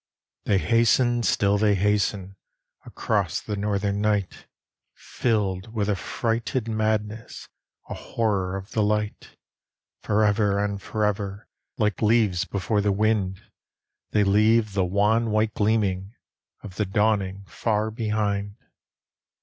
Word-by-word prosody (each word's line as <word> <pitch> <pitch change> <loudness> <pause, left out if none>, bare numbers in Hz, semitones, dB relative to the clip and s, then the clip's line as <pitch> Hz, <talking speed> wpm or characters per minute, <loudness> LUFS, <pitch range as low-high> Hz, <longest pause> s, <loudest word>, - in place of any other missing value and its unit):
They 100 - +3
hasten, 120 +3 +3
still 100 -3 +2
they 105 -1 +3
hasten, 100 -1 0 0.5
Across - - -1
the 105 - -4
northern 100 0 -1
night, 105 -3 -1 0.5
Filled 105 -3 -2
with 105 -2 0
a 105 - +2
frighted 115 +3 -2
madness, 110 0 -2 0.4
A - - -5
horror 100 -5 -1
of 95 +1 -10
the 110 - 0
light; 105 0 -2 0.6
Forever 105 -1 +2
and 100 -1 -2
forever, 105 -1 -2 0.3
Like 105 -4 0
leaves 105 -5 +2
before 100 +1 -1
the 100 0 +1
wind, 100 -2 0 0.7
They 105 - +2
leave 105 +2 +3
the 95 -2 +1
wan, 105 +5 +2
white 110 0 +1
gleaming 105 -1 0 0.5
Of 95 -3 -10
the 105 - +1
dawning 100 -2 0
far 105 +7 -1
behind. 105 -3 -2
105 Hz, 115 wpm, -24 LUFS, 100-110 Hz, 0.7 s, They